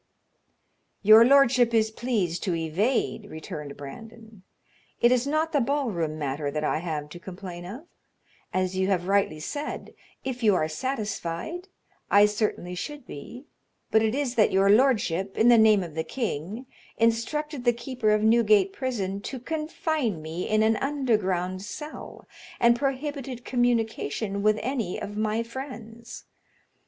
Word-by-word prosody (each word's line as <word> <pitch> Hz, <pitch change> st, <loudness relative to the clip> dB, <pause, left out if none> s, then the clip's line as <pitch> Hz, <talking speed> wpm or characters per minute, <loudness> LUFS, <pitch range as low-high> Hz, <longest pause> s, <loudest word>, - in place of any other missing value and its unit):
"Your 215 Hz, +2 st, +9 dB
lordship 250 Hz, -2 st, +5 dB
is 220 Hz, -1 st, +3 dB
pleased 215 Hz, -8 st, -1 dB
to 180 Hz, -4 st, 0 dB
evade," 205 Hz, +6 st, -1 dB
returned 150 Hz, -2 st, -7 dB
Brandon. 220 Hz, +7 st, -11 dB, 0.6 s
"It 240 Hz, -, +5 dB
is 250 Hz, +1 st, +2 dB
not 310 Hz, +2 st, 0 dB
the 285 Hz, -, +2 dB
ball 275 Hz, 0 st, 0 dB
room 160 Hz, -4 st, -2 dB
matter 145 Hz, 0 st, -2 dB
that 150 Hz, +1 st, -3 dB
I 155 Hz, -, 0 dB
have 155 Hz, -3 st, -4 dB
to 175 Hz, -, -10 dB
complain 180 Hz, -1 st, -8 dB
of; 235 Hz, -, -8 dB, 0.7 s
as 185 Hz, 0 st, -1 dB
you 190 Hz, 0 st, +1 dB
have 180 Hz, -2 st, 0 dB
rightly 195 Hz, -6 st, +1 dB
said, 290 Hz, -, -5 dB, 0.3 s
if 255 Hz, -1 st, -4 dB
you 210 Hz, -4 st, +4 dB
are 155 Hz, -, +1 dB
satisfied, 215 Hz, -, -4 dB, 0.4 s
I 205 Hz, +1 st, +7 dB
certainly 210 Hz, -4 st, -1 dB
should 290 Hz, +9 st, -6 dB
be; 240 Hz, -, -10 dB, 0.5 s
but 220 Hz, -, +5 dB
it 220 Hz, +2 st, +1 dB
is 275 Hz, -4 st, -1 dB
that 220 Hz, -4 st, +3 dB
your 195 Hz, +1 st, +4 dB
lordship, 205 Hz, -6 st, +2 dB
in 225 Hz, +2 st, +5 dB
the 240 Hz, -, +7 dB
name 215 Hz, -3 st, +5 dB
of 170 Hz, -3 st, -8 dB
the 160 Hz, +1 st, -2 dB
king, 215 Hz, -, -4 dB, 0.3 s
instructed 250 Hz, +5 st, 0 dB
the 240 Hz, -, +4 dB
keeper 240 Hz, -1 st, -2 dB
of 215 Hz, 0 st, +3 dB
Newgate 215 Hz, -4 st, +4 dB
prison 200 Hz, -7 st, -3 dB
to 260 Hz, +5 st, -6 dB
confine 305 Hz, -, -2 dB
me 160 Hz, +3 st, -5 dB
in 215 Hz, 0 st, +3 dB
an 220 Hz, 0 st, +3 dB
underground 205 Hz, -10 st, 0 dB
cell, 300 Hz, +9 st, -8 dB, 0.3 s
and 235 Hz, 0 st, +5 dB
prohibited 270 Hz, -1 st, -3 dB
communication 225 Hz, -, 0 dB
with 215 Hz, +1 st, +3 dB
any 245 Hz, -6 st, -2 dB
of 205 Hz, 0 st, -6 dB
my 215 Hz, +1 st, 0 dB
friends. 235 Hz, -2 st, -9 dB
220 Hz, 150 wpm, -26 LUFS, 185-255 Hz, 0.7 s, Your